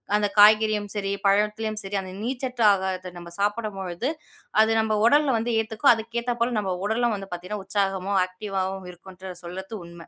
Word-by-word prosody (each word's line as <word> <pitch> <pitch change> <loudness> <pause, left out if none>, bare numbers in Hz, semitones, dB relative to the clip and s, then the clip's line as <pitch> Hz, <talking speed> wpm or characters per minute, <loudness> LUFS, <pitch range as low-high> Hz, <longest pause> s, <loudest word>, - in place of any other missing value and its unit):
அந்த 210 0 +2
காய்கறியும் 215 0 +6
சரி, 200 -1 -2
பழத்துலயும் 210 +2 +1
சரி, 195 +1 -5
அந்த 185 -1 -8
நீர்ச்சத்து 250 0 -2
ஆகாரத்த 185 -1 -3
நம்ம 175 0 -10
சாப்பிடும் 210 0 -1
பொழுது 190 +8 -3 0.5
அது 220 +1 +3
நம்ம 220 -1 +1
உடல்ல 285 +1 +4
வந்து 230 +2 -1
ஏத்துக்கும். 220 +5 +3
அதுக்கு 230 +1 -4
ஏத்தாப்போல 240 0 -1
நம்ம 190 -3 -2
உடலும் 230 +2 +1
வந்து 195 -1 -7
பார்த்தீங்கன்னா 180 +4 -5
உற்சாகமாவும், 195 -1 0
ஆக்டிவா 190 +1 -4
வும் 190 -1 -8
இருக்குன்று 185 +1 -11
சொல்றது 190 +5 -7
உண்மை. 170 -1 -12
205 Hz, 165 wpm, -25 LUFS, 190-220 Hz, 0.5 s, காய்கறியும்